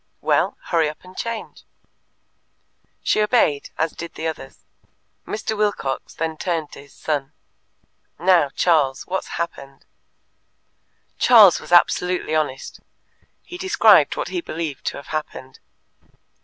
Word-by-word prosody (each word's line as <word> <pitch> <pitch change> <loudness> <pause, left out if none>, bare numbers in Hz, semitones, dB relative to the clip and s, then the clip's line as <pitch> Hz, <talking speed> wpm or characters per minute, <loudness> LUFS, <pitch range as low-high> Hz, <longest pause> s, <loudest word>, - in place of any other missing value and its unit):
"Well, - - +1
hurry 165 -3 +2
up 150 - -11
and 185 0 -15
change." 230 +1 -6 1.4
She 215 - +2
obeyed, 210 - +2
as 160 0 0
did 170 0 -9
the 160 - -6
others. 155 -4 -6 0.6
Mr. 220 +1 -3
Wilcox 205 -11 -2
then 160 -1 -3
turned 165 -4 -3
to - - -11
his 140 - -19
son. 145 -3 -3 0.8
"Now, 175 -5 +3
Charles, 145 -4 +1
what's 190 +1 -3
happened?" 140 -5 -6 1.3
Charles 210 -9 +7
was - - -12
absolutely 180 -1 +3
honest. 150 -4 -2 0.6
He 355 - -10
described 380 +5 +4
what - - -3
he 355 - -3
believed 160 - -5
to - - -3
have 140 - -11
happened. 145 -4 -6
165 Hz, 125 wpm, -21 LUFS, 150-190 Hz, 1.4 s, Charles